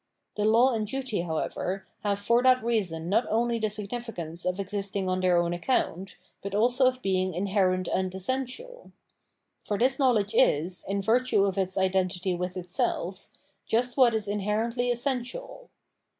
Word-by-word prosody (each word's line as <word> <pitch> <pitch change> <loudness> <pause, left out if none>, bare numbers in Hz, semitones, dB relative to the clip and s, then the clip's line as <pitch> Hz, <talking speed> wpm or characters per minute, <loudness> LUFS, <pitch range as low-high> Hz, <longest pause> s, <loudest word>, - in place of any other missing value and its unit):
The 210 - -1
law 235 +4 +5
and 215 -2 -1
duty, 260 -5 -2
however,' 180 +3 -3 0.2
have 200 -1 0
for 235 +4 +2
that 255 -1 +4
reason 190 -9 -1
not 210 +6 +2
only 235 +1 +1
the 215 -1 0
significance 205 -6 -5
of 180 +1 -1
existing 195 0 -3
on 185 0 0
their 180 -1 +3
own 170 0 +1
account, 185 -1 -1 0.3
but 200 0 -5
also 245 +4 +4
of 255 0 -1
being 185 -1 0
iuherent 185 0 +1
and 185 0 -1
essential; 265 - -5 0.7
for 205 - -2
this 260 +4 +2
knowledge 230 -6 +2
is, 180 - +2
in 195 +1 -1
virtue 225 -1 +3
of 195 -1 -1
its 185 -1 -1
identity 185 -1 0
with 180 +1 -4
itself, 180 +1 -3 0.4
just 240 +2 +1
what 245 -4 +5
is 215 -2 -2
inherently 215 +4 -1
essen 245 +2 +1
tial. - - -8
205 Hz, 160 wpm, -27 LUFS, 185-240 Hz, 0.7 s, law